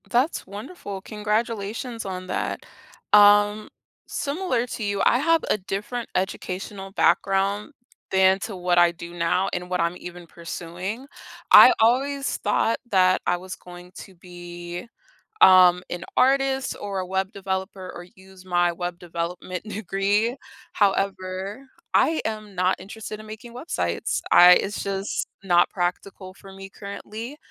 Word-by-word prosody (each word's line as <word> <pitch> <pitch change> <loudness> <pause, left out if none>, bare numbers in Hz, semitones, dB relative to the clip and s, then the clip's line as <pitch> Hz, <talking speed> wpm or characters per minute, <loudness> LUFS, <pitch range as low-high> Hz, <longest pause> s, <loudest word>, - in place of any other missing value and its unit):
That's 255 +7 0
wonderful, 200 - -8
congratulations 220 +2 -3
on 185 -1 -5
that. 185 - -3 0.5
Um, 205 +1 +6 0.4
similar 280 -5 -1
to 230 - -5
you, 200 -1 -1
I 240 - +4
have 330 +3 +2
a - - +3
different 210 +5 -5
educational 190 +1 -4
background 200 +4 +1 0.4
than 190 0 +4
to 210 0 -6
what 180 -1 0
I 175 0 +6
do 170 0 -10
now 175 +2 0
and 180 0 -4
what 180 0 -1
I'm 170 +1 0
even 175 -1 -10
pursuing. 175 +8 -6 0.5
I - - +11
always 275 +5 +1
thought 215 +2 +1
that 185 -1 +4
I 180 - +2
was 185 +1 -8
going 180 0 -13
to 190 - -12
be, 175 +1 -9 0.5
um, 180 -1 +7
an 175 0 -5
artist, 270 0 +2
or 200 -2 -4
a 185 - -3
web 190 +2 -2
developer, 190 -1 -4
or 175 - -9
use 190 0 -17
my 175 -1 +2
web 175 0 -5
development 175 +1 -5
degree, 205 +3 0 0.3
however, 195 +3 -1 0.3
I 320 0 +3
am 215 -2 -5
not 185 +1 +1
interested 215 +3 -8
in 215 - -11
making 220 +2 -10
websites, 255 +7 -2
I 180 0 +9
it's 195 +2 0
just 195 0 -3 0.2
not 175 -2 +4
practical 185 +1 -4
for 195 0 -14
me 195 0 -10
currently, 215 +7 -8
195 Hz, 140 wpm, -24 LUFS, 180-215 Hz, 0.5 s, I